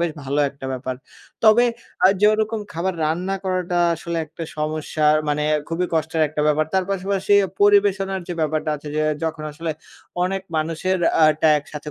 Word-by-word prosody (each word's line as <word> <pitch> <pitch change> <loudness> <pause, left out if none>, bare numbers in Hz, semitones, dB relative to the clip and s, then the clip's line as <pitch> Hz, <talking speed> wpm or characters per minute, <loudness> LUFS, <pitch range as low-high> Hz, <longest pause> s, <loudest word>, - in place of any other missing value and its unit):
বেশ 170 -1 +1
ভালো 140 +2 -2
একটা 140 -1 -9
ব্যাপার। 130 0 -4 0.5
তবে 220 +3 +6 0.4
আ - - +9
যে 210 - +6
ওরকম 220 +1 -1
খাবার 175 +3 -2
রান্না 180 +5 -1
করাটা 180 -2 -1 0.2
আসলে 170 +1 -5
একটা 160 +2 -9 0.2
সমস্যার 155 0 +1
মানে 150 0 0 0.3
খুবই 170 +2 -1
কষ্টের 160 0 0
একটা 150 - -3
ব্যাপার। 150 +1 +2
তার 190 -1 +2
পাশাপাশি 195 +1 -1 0.3
পরিবেশনার 200 -1 +3
যে - - -2
ব্যাপারটা 155 0 -1
আছে 150 +1 -10
যে, 155 - +1 0.2
যখন 160 -1 -3
আসলে 165 +2 -4 0.5
অনেক 195 +1 -2
মানুষের 165 +4 -1 0.2
আ - - +8 0.2
টা 160 - +6
একসাথে 150 +1 -9
165 Hz, 165 wpm, -21 LUFS, 155-190 Hz, 0.5 s, আ